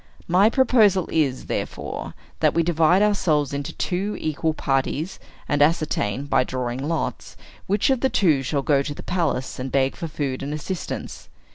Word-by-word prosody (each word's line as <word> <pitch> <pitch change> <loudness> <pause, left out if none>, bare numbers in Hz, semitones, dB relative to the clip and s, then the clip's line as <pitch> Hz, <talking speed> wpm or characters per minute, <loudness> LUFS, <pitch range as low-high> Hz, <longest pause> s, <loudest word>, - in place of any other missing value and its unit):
My 185 +5 +5
proposal 220 -8 +4
is, 140 -5 0
therefore, - - -4 0.2
that - - +2
we 170 - +3
divide 170 +3 +3
ourselves 155 -9 +1
into 140 0 -3
two 195 +4 -2
equal 155 +1 -1
parties, 140 +6 -1 0.3
and 145 0 +1
ascertain, 145 -6 +1
by 145 - +2
drawing 125 0 -3
lots, 165 -1 -3 0.3
which 205 +7 +2
of 265 - +2
the 265 - +2
two 160 - +3
shall 135 +2 -1
go 140 -1 +3
to 145 +1 -4
the - - -9
palace, 165 -9 -1
and 130 0 -4
beg 135 -1 +1
for 165 - -5
food 140 -4 -3
and 145 +2 -3
assistance. 175 +4 -6
155 Hz, 165 wpm, -23 LUFS, 140-185 Hz, 0.3 s, My